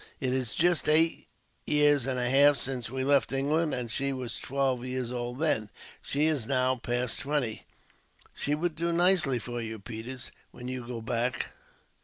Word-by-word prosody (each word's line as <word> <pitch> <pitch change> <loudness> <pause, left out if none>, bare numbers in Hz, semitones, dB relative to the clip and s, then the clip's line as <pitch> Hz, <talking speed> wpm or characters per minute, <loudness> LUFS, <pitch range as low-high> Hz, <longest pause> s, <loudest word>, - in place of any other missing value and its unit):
It 130 -2 0
is 130 -4 -1
just 175 -2 +2
eight 160 +2 +3 0.4
years 145 -3 +3
and 130 -1 -1
a 125 -1 0
half 140 +2 +6
since 125 -2 -3
we 130 +1 -3
left 140 0 +3
England, 150 +4 +1
and 120 -3 -4
she 140 +4 0
was 130 -3 -4
twelve 135 -2 0
years 125 -1 -3
old 120 0 -3
then. 135 -9 +1 0.3
She 145 +2 0
is 145 -8 +1
now 130 -1 +2
past 120 0 -2
twenty. 140 -6 -2 0.7
"She 145 - -1
would 165 +1 -1
do 170 +2 -1
nicely 175 -6 +3
for 120 0 -5
you, 110 -1 -5
Peters, 120 +4 -6 0.2
when 125 0 -9
you 125 -1 -5
go 120 -2 -5
back. 120 +2 -1
130 Hz, 175 wpm, -29 LUFS, 120-145 Hz, 0.7 s, half